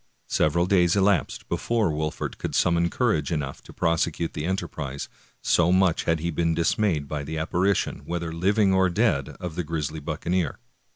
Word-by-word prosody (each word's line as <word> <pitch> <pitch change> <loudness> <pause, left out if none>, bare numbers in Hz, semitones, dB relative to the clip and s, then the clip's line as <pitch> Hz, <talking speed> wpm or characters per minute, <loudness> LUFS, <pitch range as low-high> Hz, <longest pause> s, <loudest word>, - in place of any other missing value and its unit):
Several 85 +3 +2
days 90 -2 +3
elapsed 100 -4 +1
before 115 -7 0
Wolfert 75 0 -3
could - - -3
summon 85 -1 +3
cour 120 +1 +1
age 75 0 -4
enough 70 -4 -3
to - - -14
prosecute 85 0 0
the 75 - -3
enterprise, 80 -7 -3 0.4
so 85 0 +3
much 95 -2 +3
had 80 -1 +1
he 85 +1 -1
been 85 +1 0
dismayed 85 - +1
by 75 -1 -3
the 80 +3 -5
apparition, 90 +5 0
whether 85 -1 -3
living 95 +4 +2
or 95 0 +4
dead, 85 - +1
of 90 -3 -5
the 90 +2 -2
grisly 80 -1 -3
buccaneer. 85 +2 -2
85 Hz, 170 wpm, -25 LUFS, 80-95 Hz, 0.4 s, or